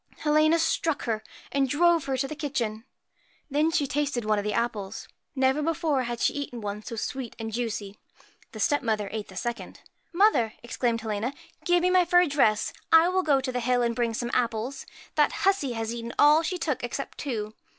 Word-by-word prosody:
Helena 310 Hz, +2 st, +3 dB
struck 320 Hz, -1 st, 0 dB
her, 220 Hz, -2 st, -1 dB, 0.3 s
and 275 Hz, -1 st, +1 dB
drove 335 Hz, +2 st, +3 dB
her 270 Hz, -1 st, -1 dB
to 270 Hz, +1 st, -1 dB
the 305 Hz, -, -6 dB
kitchen. 235 Hz, -7 st, -3 dB, 0.7 s
Then 300 Hz, +3 st, +3 dB
she 325 Hz, -3 st, +1 dB
tasted 275 Hz, -4 st, -1 dB
one 215 Hz, -1 st, +2 dB
of -, -, -3 dB
the 210 Hz, -, -1 dB
apples. 215 Hz, -4 st, -3 dB, 0.3 s
Never 265 Hz, +2 st, +2 dB
before 315 Hz, -3 st, 0 dB
had 240 Hz, 0 st, -4 dB
she -, -, +2 dB
eaten 285 Hz, -4 st, -5 dB
one 210 Hz, -1 st, -4 dB
so 230 Hz, -, -7 dB
sweet 250 Hz, +2 st, -4 dB
and 225 Hz, -1 st, -5 dB
juicy. 220 Hz, -4 st, -3 dB, 0.5 s
The 220 Hz, -, -9 dB
step 290 Hz, +7 st, +2 dB
mother 215 Hz, -5 st, -1 dB
ate 215 Hz, -1 st, -4 dB
the 190 Hz, -, -13 dB
second. 225 Hz, -1 st, -5 dB, 0.3 s
'Mother!' 345 Hz, -, +3 dB
exclaimed 240 Hz, -1 st, -1 dB
Helena, 220 Hz, +4 st, -3 dB, 0.3 s
'give 350 Hz, 0 st, +3 dB
me 365 Hz, -, +3 dB
my 365 Hz, -1 st, +5 dB
fur 355 Hz, +1 st, +5 dB
dress. 270 Hz, -9 st, +2 dB, 0.2 s
I 325 Hz, +2 st, +7 dB
will 375 Hz, +1 st, +2 dB
go 290 Hz, -6 st, +3 dB
to 260 Hz, -1 st, -3 dB
the 250 Hz, -, -2 dB
hill 245 Hz, 0 st, +1 dB
and 235 Hz, -1 st, 0 dB
bring 235 Hz, -1 st, 0 dB
some 240 Hz, +1 st, -3 dB
apples. 235 Hz, +2 st, -1 dB, 0.3 s
That 295 Hz, -1 st, +3 dB
hussey 380 Hz, -10 st, +2 dB
has 225 Hz, 0 st, -3 dB
eaten 235 Hz, 0 st, -6 dB
all 300 Hz, +2 st, +6 dB
she 360 Hz, +3 st, -2 dB
took 305 Hz, -7 st, -2 dB
except 245 Hz, +3 st, -5 dB
two.' 220 Hz, -6 st, -3 dB
255 Hz, 200 wpm, -27 LUFS, 225-300 Hz, 0.7 s, I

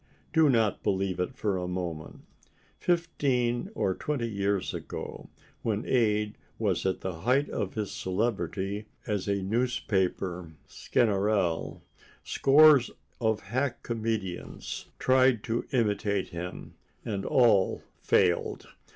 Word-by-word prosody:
Do 160 Hz, -2 st, +5 dB
not 115 Hz, -5 st, +2 dB
believe 95 Hz, -1 st, 0 dB
it 90 Hz, +8 st, -2 dB
for 105 Hz, -6 st, -1 dB
a 90 Hz, -1 st, -3 dB
moment. 90 Hz, -3 st, -5 dB, 0.6 s
Fifteen 140 Hz, -6 st, 0 dB
or 95 Hz, -, +1 dB
twenty 130 Hz, +1 st, -2 dB
years 100 Hz, -2 st, -1 dB
ago, -, -, -7 dB, 0.3 s
when 110 Hz, 0 st, -1 dB
Ade 105 Hz, -4 st, +1 dB, 0.2 s
was -, -, 0 dB
at 95 Hz, -, -1 dB
the 90 Hz, -3 st, -4 dB
height 130 Hz, +6 st, +2 dB
of 100 Hz, -, -3 dB
his 105 Hz, -3 st, -2 dB
celebrity 100 Hz, 0 st, -2 dB, 0.2 s
as 105 Hz, -2 st, -2 dB
a 100 Hz, -1 st, 0 dB
newspaper 95 Hz, -6 st, -1 dB
Sganarelle, 100 Hz, -6 st, 0 dB, 0.4 s
scores 145 Hz, -2 st, +6 dB, 0.3 s
of 110 Hz, -2 st, +1 dB
hack 125 Hz, +5 st, -2 dB
comedians 110 Hz, -6 st, -4 dB
tried 130 Hz, -3 st, +3 dB
to 115 Hz, 0 st, -2 dB
imitate 105 Hz, -5 st, 0 dB
him—and 90 Hz, +3 st, -7 dB
all 110 Hz, -7 st, +3 dB, 0.2 s
failed. 90 Hz, -2 st, +1 dB
105 Hz, 110 wpm, -28 LUFS, 95-120 Hz, 0.6 s, scores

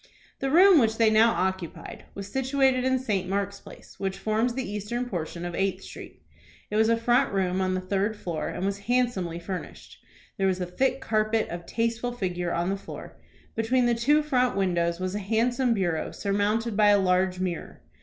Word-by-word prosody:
The 270 Hz, -, -1 dB
room 360 Hz, +3 st, +7 dB
which 220 Hz, -3 st, +2 dB
they 225 Hz, -1 st, +4 dB
now 220 Hz, +2 st, +6 dB
occupied 190 Hz, -2 st, -4 dB
was 200 Hz, -1 st, -6 dB
situated 265 Hz, +2 st, +1 dB
in 260 Hz, 0 st, +2 dB
St. 200 Hz, -8 st, -2 dB
Mark's 200 Hz, 0 st, -2 dB
Place, -, -, -14 dB
which 195 Hz, -1 st, -2 dB
forms 220 Hz, +4 st, 0 dB
the 260 Hz, -1 st, -3 dB
eastern 210 Hz, +5 st, -3 dB
portion 175 Hz, -3 st, -4 dB
of 175 Hz, -, -4 dB
Eighth 195 Hz, +1 st, -1 dB
Street. -, -, -11 dB, 0.5 s
It -, -, -2 dB
was 220 Hz, +1 st, +4 dB
a 230 Hz, -, +3 dB
front 245 Hz, +3 st, +2 dB
room 190 Hz, -1 st, 0 dB
on 185 Hz, 0 st, 0 dB
the 185 Hz, -, -2 dB
third 200 Hz, +3 st, -1 dB
floor, 170 Hz, -6 st, -4 dB
and 190 Hz, -, -3 dB
was 200 Hz, 0 st, -2 dB
handsomely 235 Hz, -9 st, +1 dB
furnished. 180 Hz, +2 st, -7 dB, 0.4 s
There 195 Hz, -, +3 dB
was 185 Hz, -1 st, 0 dB
a 180 Hz, -, -1 dB
thick 260 Hz, +10 st, 0 dB
carpet, 215 Hz, -1 st, 0 dB
of 170 Hz, 0 st, -7 dB
tasteful 230 Hz, +1 st, -1 dB
figure, 180 Hz, -6 st, -2 dB
on 175 Hz, +3 st, 0 dB
the 195 Hz, -, -1 dB
floor. 195 Hz, -, -10 dB, 0.3 s
Between 240 Hz, +3 st, +1 dB
the 240 Hz, -, +3 dB
two 290 Hz, +6 st, +3 dB
front 255 Hz, -6 st, +1 dB
windows 170 Hz, -3 st, 0 dB
was 185 Hz, 0 st, -2 dB
a 205 Hz, -, -2 dB
handsome 230 Hz, +4 st, +1 dB
bureau, 175 Hz, -5 st, -1 dB
surmounted 205 Hz, +3 st, -1 dB
by 210 Hz, 0 st, +4 dB
a 205 Hz, -, +6 dB
large 185 Hz, -1 st, +1 dB
mirror. 180 Hz, -2 st, -4 dB
205 Hz, 195 wpm, -26 LUFS, 185-240 Hz, 0.5 s, room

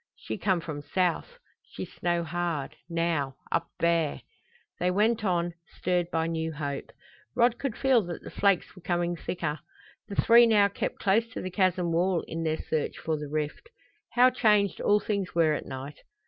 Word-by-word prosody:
"She -, -, -6 dB
come 185 Hz, -2 st, +1 dB
from 155 Hz, -3 st, -5 dB
south. 180 Hz, -, -1 dB, 0.3 s
She -, -, -6 dB
snow 175 Hz, -1 st, -1 dB
hard 165 Hz, -3 st, -3 dB
now 165 Hz, -5 st, 0 dB, 0.2 s
up -, -, 0 dB
there!" 170 Hz, -3 st, +1 dB, 0.6 s
They 180 Hz, -, +2 dB
went 215 Hz, +4 st, +2 dB
on, 175 Hz, -3 st, 0 dB, 0.2 s
stirred 175 Hz, -1 st, 0 dB
by 160 Hz, -1 st, 0 dB
new 160 Hz, -1 st, -2 dB
hope. 145 Hz, -2 st, -4 dB, 0.5 s
Rod 240 Hz, 0 st, +3 dB
could 270 Hz, -5 st, -3 dB
feel 265 Hz, -4 st, +4 dB
that 175 Hz, -, -6 dB
the -, -, -9 dB
flakes 200 Hz, -3 st, +1 dB
were 185 Hz, -, -13 dB
coming 175 Hz, 0 st, 0 dB
thicker. 160 Hz, -3 st, -3 dB, 0.5 s
The 200 Hz, -, -6 dB
three 235 Hz, +2 st, +7 dB
now 205 Hz, -3 st, +5 dB
kept 200 Hz, -, -3 dB
close 220 Hz, +4 st, +2 dB
to -, -, -4 dB
the 185 Hz, -, -4 dB
chasm 185 Hz, -2 st, +1 dB
wall 175 Hz, +1 st, +1 dB
in 165 Hz, 0 st, -4 dB
their 160 Hz, -1 st, 0 dB
search 155 Hz, -1 st, -2 dB
for 160 Hz, -, -2 dB
the 150 Hz, -1 st, -6 dB
rift. 150 Hz, -, -3 dB, 0.4 s
How 250 Hz, +1 st, +6 dB
changed 210 Hz, -5 st, +2 dB
all 205 Hz, 0 st, +4 dB
things 200 Hz, -5 st, -3 dB
were 160 Hz, -2 st, +4 dB
at -, -, -4 dB
night! 135 Hz, +2 st, -7 dB
175 Hz, 175 wpm, -28 LUFS, 160-200 Hz, 0.6 s, three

